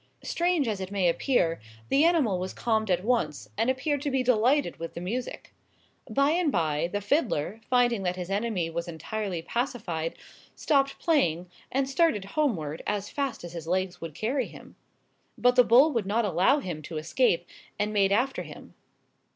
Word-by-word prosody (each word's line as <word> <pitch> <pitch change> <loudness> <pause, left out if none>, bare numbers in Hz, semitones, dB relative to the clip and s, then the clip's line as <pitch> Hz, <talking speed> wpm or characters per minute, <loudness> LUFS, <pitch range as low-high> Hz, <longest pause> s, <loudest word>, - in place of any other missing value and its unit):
Strange 345 -5 +1
as 205 -3 -2
it 190 - -4
may 195 -3 +1
appear, 170 - +1 0.3
the 285 - +4
animal 300 - +3
was 185 +1 -5
calmed 220 -2 0
at 180 0 +1
once, 150 - -1
and 230 - +1
appeared 280 +2 0
to 290 - -1
be 265 -1 +1
delighted 250 +4 +2
with 165 0 -6
the - - -4
music. 225 +9 -5 0.6
By 275 +2 +2
and 335 -2 +2
by, 160 - 0
the 205 - -2
fiddler, 210 - 0
finding 245 -4 +3
that 180 -1 -1
his 180 +1 -6
enemy 200 -4 0
was 170 +1 -3
entirely 175 +2 -4
pacified, 195 -9 -3 0.4
stopped 275 -2 +1
playing, 180 - +1 0.2
and 270 0 +1
started 270 - +2
homeward, 170 - -1
as 205 -1 -2
fast 275 -8 -3
as 175 -1 -8
his 165 -2 -7
legs 185 +1 -1
would 165 -3 -7
carry 245 - -1
him. - - -14 0.6
But 245 +2 +3
the 250 - +7
bull 260 +7 +6
would 230 -7 -1
not 225 +3 +1
allow 190 - +3
him 170 - -5
to 155 +2 -7
escape, 175 +2 +1 0.3
and 210 +1 -1
made 200 -2 +3
after 250 +6 +1
him. - - -11
215 Hz, 175 wpm, -27 LUFS, 175-260 Hz, 0.6 s, the